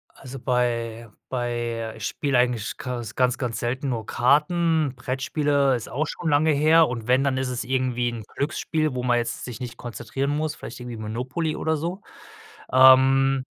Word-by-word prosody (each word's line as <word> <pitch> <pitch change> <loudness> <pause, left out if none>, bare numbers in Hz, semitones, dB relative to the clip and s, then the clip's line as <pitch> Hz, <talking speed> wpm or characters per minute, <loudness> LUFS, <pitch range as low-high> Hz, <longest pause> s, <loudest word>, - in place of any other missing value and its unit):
Also, 135 0 -9
bei 115 -2 -1 0.2
bei 120 -2 -3
ich 110 - -6
spiele 140 -4 0
eigentlich 125 -3 0
Kas 120 -3 -5
ganz 125 0 +2
ganz 120 -3 -3
selten 130 +4 -2
nur 115 -4 -3
Karten, 155 +2 +2
Brettspiele 135 +2 0
ist 120 - -5
auch 150 +5 -1
schon 165 +2 -3
lange 150 +2 +3
her 155 +2 +5
und 120 -2 -5
wenn, 130 +2 +4
dann 135 -2 0
isses 125 -2 -2
irgendwie 125 -1 0
'n 115 -2 -7
Glücksspiel, 155 0 -1
wo 125 -1 -3
man 120 -1 +2
jetzt 120 - -3
sich 125 -2 -7
nicht 120 -2 -6
konzentrieren 120 +4 -4
muss, 155 +1 -1
vielleicht 120 +1 -9
irgendwie 120 -1 -7
Monopoly 125 +9 -3
oder 160 0 0
so. 175 +6 -4 0.7
Ähm, 130 +1 +6
130 Hz, 170 wpm, -24 LUFS, 120-145 Hz, 0.7 s, Ähm